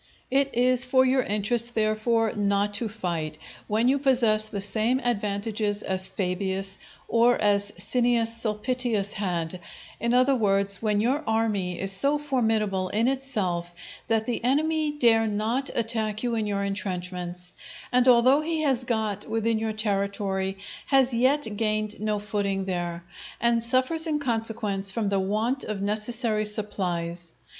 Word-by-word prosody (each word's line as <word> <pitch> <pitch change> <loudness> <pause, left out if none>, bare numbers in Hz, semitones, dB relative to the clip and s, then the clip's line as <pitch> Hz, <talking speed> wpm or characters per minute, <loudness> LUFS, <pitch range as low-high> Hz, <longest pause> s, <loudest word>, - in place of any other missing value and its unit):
It 275 +1 +2
is 250 +1 +4
for 260 0 +4
your 260 0 +3
interest, 230 +3 -1
therefore, 220 +1 +1
not 205 0 0
to 220 +2 0
fight, 170 -8 -3 0.3
when 220 +3 +1
you 275 +2 +3
possess 240 -6 +3
the 205 - -5
same 220 +5 0
advantages 210 -2 -1
as 190 0 +1
Fabius, 190 0 -2 0.3
or 235 +1 +3
as 205 -1 +2
Cneius 235 +3 +1
Sulpitius 225 -1 -1
had; 180 -3 -3 0.4
in 235 +1 +1
other 255 +2 +4
words, 200 -3 +1
when 210 -2 +1
your 265 +7 +1
army 215 -5 0
is 195 0 +1
so 280 +9 +3
formidable 220 -9 0
in 225 +3 +1
itself 200 -11 -2 0.3
that 225 -1 +1
the 240 -1 -3
enemy 305 +4 +1
dare 230 -6 +3
not 220 +6 -1
attack 220 -2 -1
you 240 -1 0
in 220 -2 -1
your 200 -1 -1
intrenchments, 180 -2 -4 0.4
and 250 0 +3
although 255 +4 +6
he 320 0 -1
has 265 -5 +1
got 220 -4 -2
within 225 0 0
your 220 0 -1
territory 200 -2 -2 0.3
has 265 -2 +3
yet 260 +3 +2
gained 215 -1 -1
no 215 -1 0
footing 200 -2 -2
there, 175 -2 -3 0.4
and 235 -1 +2
suffers 260 +7 +2
in 305 -2 +1
consequence 225 -6 -1
from 210 0 -1
the 200 -1 +1
want 215 +7 0
of 215 -2 -4
necessary 215 +1 -1
supplies. 175 -5 -3
215 Hz, 145 wpm, -26 LUFS, 200-245 Hz, 0.4 s, although